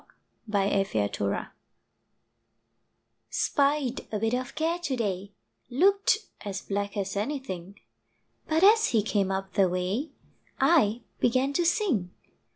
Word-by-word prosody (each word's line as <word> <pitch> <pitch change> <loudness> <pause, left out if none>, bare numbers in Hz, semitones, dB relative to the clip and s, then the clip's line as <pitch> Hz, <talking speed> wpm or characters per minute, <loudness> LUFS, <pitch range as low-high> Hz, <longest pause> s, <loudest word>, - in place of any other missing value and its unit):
EXORCISED 195 - +1 2.1
SPIED 280 -2 0
a 215 - -1
bit 225 +2 0
of 255 0 -3
Care 330 +2 0
to 295 -7 -2
day, 200 -4 -2 0.4
Looked 395 - +3 0.3
as 195 -1 -5
black 200 +1 -3
as 195 -1 -2
anything, 205 - -4 0.7
But 320 +2 +1
as 440 +3 +6
he 220 -3 +2
came 200 -2 0
up 190 0 -3
the 190 -2 +3
way, 185 - -1 0.5
I 245 -9 +3 0.2
began 260 +3 +2
to 345 +3 +1
sing. 330 - +1
225 Hz, 115 wpm, -27 LUFS, 195-295 Hz, 2.1 s, as